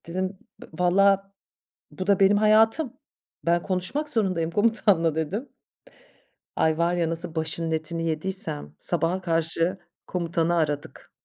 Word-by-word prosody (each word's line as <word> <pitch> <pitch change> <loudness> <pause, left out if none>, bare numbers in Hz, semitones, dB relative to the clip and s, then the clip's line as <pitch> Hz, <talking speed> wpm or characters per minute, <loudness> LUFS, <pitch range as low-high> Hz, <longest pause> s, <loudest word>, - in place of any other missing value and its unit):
Dedim 185 +3 -3 0.2
b - - -9
valla 195 +2 +3 0.6
bu 185 - -6
da 200 -2 +4
benim 195 +1 +5
hayatım. 220 +6 +3 0.5
Ben 170 +1 +2
konuşmak 200 +12 -2
zorundayım 185 - 0
komutanla, 205 -6 +2
dedim. 185 - -3 1.1
Ay, 160 -1 +2
var 170 +1 +1
ya, 170 -2 0
nasıl 165 0 -4
başının 160 +1 -2
etini 165 +1 -2
yediysem 155 - -3
sabaha 175 +2 0
karşı 165 +1 0 0.3
komutanı 170 -1 0
aradık. 150 -3 -3
175 Hz, 125 wpm, -25 LUFS, 165-195 Hz, 1.1 s, benim